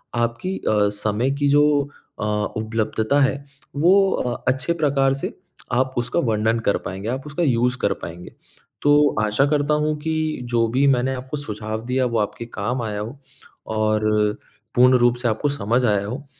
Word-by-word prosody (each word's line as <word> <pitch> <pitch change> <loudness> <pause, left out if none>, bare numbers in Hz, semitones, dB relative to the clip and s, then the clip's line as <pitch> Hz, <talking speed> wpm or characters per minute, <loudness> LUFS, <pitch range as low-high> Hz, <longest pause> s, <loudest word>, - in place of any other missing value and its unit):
आपकी 120 +11 -1
अ, 105 -1 +1
समय 110 +5 0
की 145 - +2
जो 145 +1 +5 0.6
अ, - - -3 0.3
उपलब्धता 110 +3 0
है 135 - +3 0.4
वो 190 +6 +4
अ, 125 -1 -2
अच्छे 130 +5 +1
प्रकार 140 -4 +2
से - - -3 0.4
आप 130 +1 +1
उसका 120 0 0
वर्णन 110 -1 +1
कर 100 - +3
पाएँगे 95 +4 -5
आप 130 +2 -3
उसका 150 +4 -2
यूज़ 125 -3 +2
कर - - +2
पाएँगे। 85 +1 -8 0.5
तो 145 0 +4
आशा 105 +6 +2
करता 150 0 +1
हूँ 150 0 +1
कि, 155 0 -2
जो 120 -1 +1
भी 130 +5 +1
मैंने 130 0 +2
आपको 130 +3 -5
सुझाव 110 -4 -5
दिया 130 +1 +1
वो 115 -2 0
आपके 115 +3 -3
काम 120 +5 -2
आया 105 -2 -3
हो 115 +7 -6 0.6
और 110 0 +1 0.7
पूर्ण 125 +1 +6
रूप 120 0 +4
से 120 0 -1
आपको 120 +6 0
समझ 125 -2 0
आया 105 -3 +1
हो 130 +7 -6
125 Hz, 170 wpm, -22 LUFS, 110-140 Hz, 0.7 s, पूर्ण